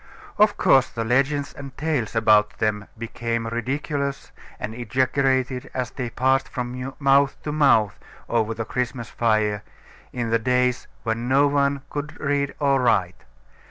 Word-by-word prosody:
Of 210 0 +4
course, 135 -2 +4
the 115 - -3
legends 140 +5 +1
and 140 -2 -10
tales 145 -8 -1
about 105 -2 +4
them 105 -1 -1
became 115 0 -3
ridiculous 140 +4 -3 0.3
and 110 - -4
exaggerated 130 +2 0
as 130 -1 -2
they 125 -3 -4
passed 130 +3 +1
from 125 +1 -4
mouth 140 0 +3
to 150 - -3
mouth 135 -9 +3 0.3
over 115 -1 0
the 115 - -4
Christmas 125 -1 -3
fire, 110 -3 +1 0.5
in 120 -2 -3
the 115 - +3
days 125 +1 +1 0.2
when 115 +1 -2
no 140 +2 +5
one 140 -1 +1
could 150 +1 -5
read 140 -1 -1
or 140 -2 +2
write. 95 -7 +1
125 Hz, 145 wpm, -23 LUFS, 115-140 Hz, 0.5 s, no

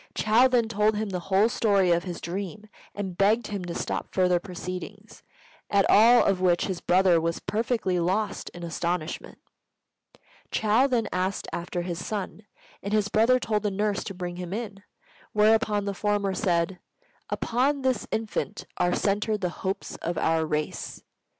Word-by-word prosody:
Chou 225 +4 +4
then 240 -3 +2
told 215 -1 +2
him 215 0 -2
the 180 - -2
whole 195 +3 +4
story 200 -6 +2
of 170 +1 +2
his 175 -2 -5
dream, 195 +4 -5 0.3
and 195 -3 -4
begged 215 +4 +3
him 200 -3 -4
to 170 - -5
stop - - -3
further 180 -2 +2
proceedings; 180 -1 -8 0.5
at 200 -1 +3
all 235 +3 +7
of 190 -2 +1
which 175 -2 +3
his 185 -3 -4
brother 180 -2 +4
was 165 0 -1
perfectly 220 -4 -1
lost 195 +4 -1
in 175 - -10
astonishment. 170 -1 -3 1.1
Chou 220 +5 +3
then 240 -4 0
asked 185 +1 -1
after 175 0 -3
his 175 -1 -4
son, 210 0 -5 0.3
and 200 +2 -4
his 210 -1 +2
brother 230 +5 +4
told 215 -3 -1
the 210 - 0
nurse 205 0 -1
to 195 - -6
bring 175 -1 -5
him 180 0 -5
in; 205 -3 -5 0.5
whereupon 210 -1 +3
the 200 - -2
former 205 -1 0
said, 180 -2 0 0.5
"Upon 270 +4 0
this 260 -4 0
infant 220 -1 -3
are 180 0 +2
centered 210 +1 0
the 180 - 0
hopes 190 +2 -4
of 170 0 -3
our 160 0 +1
race. 150 0 -3
200 Hz, 165 wpm, -26 LUFS, 180-215 Hz, 1.1 s, all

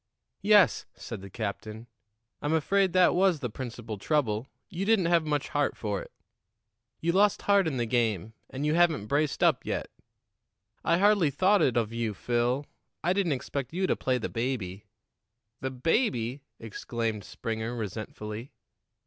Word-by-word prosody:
"Yes," 205 -5 +5
said 110 -5 -7
the 100 - -9
captain, 110 +1 -5 0.6
"I'm 145 +2 0
afraid 190 +4 +2
that 185 -1 +5
was 180 -3 +3
the 125 -5 -4
principal 115 -3 -6
trouble 120 -3 0 0.2
you 185 -1 -4
didn't 210 -3 +3
have 170 -2 +3
much 145 -2 -1
heart 145 -1 0
for 105 -3 -2
it. - - -11 0.9
You 170 - +2
lost 200 +3 +3
heart 200 -3 +4
in 140 -5 -1
the 120 - 0
game, 110 -4 0 0.2
and 135 +3 -4
you 150 - +2
haven't 165 -9 +3
braced 145 +5 0
up - - +4
yet. - - -3 0.9
I 170 - +3
hardly 200 -4 +4
thought 185 +8 +3
it 125 -6 +2
of 115 -1 0
you, 115 -3 -2
Phil; 120 +6 0 0.4
I 175 +3 +3
didn't 190 -5 +1
expect 135 +1 -4
you 190 +2 0
to - - +2
play 130 -1 0
the 115 - -3
baby." 110 -5 -3 0.7
"The 130 - -2
baby!" 130 - 0 0.2
exclaimed 115 -1 -4
Springer 115 +4 -4
resentfully. 110 +2 -6
130 Hz, 155 wpm, -28 LUFS, 115-170 Hz, 0.9 s, Yes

